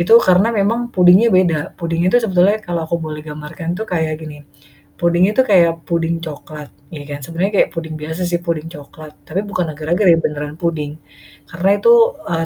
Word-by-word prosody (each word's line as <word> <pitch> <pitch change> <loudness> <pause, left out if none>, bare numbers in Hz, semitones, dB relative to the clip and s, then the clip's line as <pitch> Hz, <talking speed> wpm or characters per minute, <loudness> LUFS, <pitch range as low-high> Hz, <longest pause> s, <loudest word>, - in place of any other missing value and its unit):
Itu 225 +7 +6
karena 190 +1 +3
memang 225 +2 0
pudingnya 185 +5 +6
beda, 185 -4 +3 0.2
pudingnya 170 +1 -1
itu 245 - +4
sebetulnya 190 +1 +2
kalau 170 -1 -2
aku 165 +1 -2
boleh 155 -2 -6
gambarkan 155 +4 -6
itu 220 - -3
kayak 160 -4 -1
gini. 150 -2 -10 0.6
Pudingnya 175 +3 +2
itu 260 - +3
kayak 170 -4 +5 0.2
pudding 170 0 0
coklat 150 -1 -9 0.2
ya 150 - -7
kan. 145 - -5
Sebenarnya 170 +4 -2
kayak - - +3
pudding 160 -2 -6
biasa 160 +3 -5
sih 175 - 0
pudding 165 -1 -3
coklat 150 0 -12
tapi 185 +5 -2
bukan 180 -2 -1
agar-agar 165 +7 -1
ya, - - +3
beneran 150 -1 -4
pudding, 160 -4 -2 0.6
karena 175 +4 -1
itu, 470 - +5 0.4
eee, 165 -1 -1
170 Hz, 185 wpm, -17 LUFS, 155-185 Hz, 0.6 s, Itu